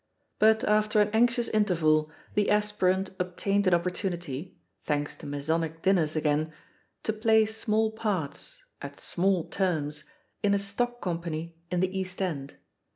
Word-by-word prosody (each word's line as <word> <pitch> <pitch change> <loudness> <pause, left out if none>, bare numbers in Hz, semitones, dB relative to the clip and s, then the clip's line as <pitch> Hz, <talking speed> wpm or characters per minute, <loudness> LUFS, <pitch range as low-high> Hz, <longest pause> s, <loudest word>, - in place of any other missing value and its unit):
But 220 +1 +5
after 215 0 +3
an 210 0 +4
anxious 240 +1 +3
interval, 160 -8 +2 0.2
the 205 -1 +2
aspirant 205 -3 +1
obtained 195 +2 0
an 180 - +6
opportunity 175 -3 -3
— 95 - -34
^thanks 145 -1 -1
to - - -8
Masonic 160 +3 -2
dinners 170 -5 +2
again 155 0 +1 0.3
— - - -42
^to 215 -1 -3
play 220 -1 +5
small 220 0 0
parts, 220 - -4 0.2
at - - -8
small 185 -1 +1
terms, 155 -7 -2 0.4
in 200 -2 +3
a - - +3
stock 240 +5 -2
company 170 -2 -3
in 180 -1 0
the 185 +1 0
East 185 0 -4
End. 150 -8 -3
185 Hz, 150 wpm, -28 LUFS, 160-210 Hz, 0.4 s, an